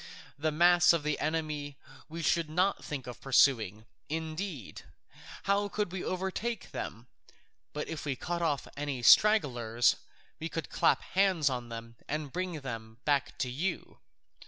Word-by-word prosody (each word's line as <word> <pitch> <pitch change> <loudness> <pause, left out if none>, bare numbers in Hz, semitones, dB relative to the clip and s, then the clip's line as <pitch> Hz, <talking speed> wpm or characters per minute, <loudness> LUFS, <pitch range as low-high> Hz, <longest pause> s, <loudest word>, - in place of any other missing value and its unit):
The 155 +2 -1
mass 175 +2 +6
of 165 -3 0
the 150 0 -1
enemy 150 -2 -2 0.3
we 165 +1 -5
should 165 -1 +2
not 185 +5 +1
think 140 -4 -5
of 125 -1 -9
pursuing; 115 -6 +3 0.2
indeed, 160 - -4 0.6
how 200 +1 +2
could 205 -3 -2
we 185 -1 -4
overtake 190 +4 -3
them? 115 +2 -6 0.7
But 150 - -4
if 160 -2 -5
we 140 -3 -1
cut 175 +6 -3
off 150 -5 0
any 140 -4 -3
stragglers, 120 - +5 0.4
we 160 - -4
could 165 - -5
clap - - +3
hands 185 -7 +2
on 125 -2 -4
them 115 0 -8
and 150 -2 -3
bring 180 -4 -3
them 115 -4 -7
back 145 -1 +1
to 130 - -1
you. 165 +10 -3
150 Hz, 150 wpm, -31 LUFS, 130-175 Hz, 0.7 s, mass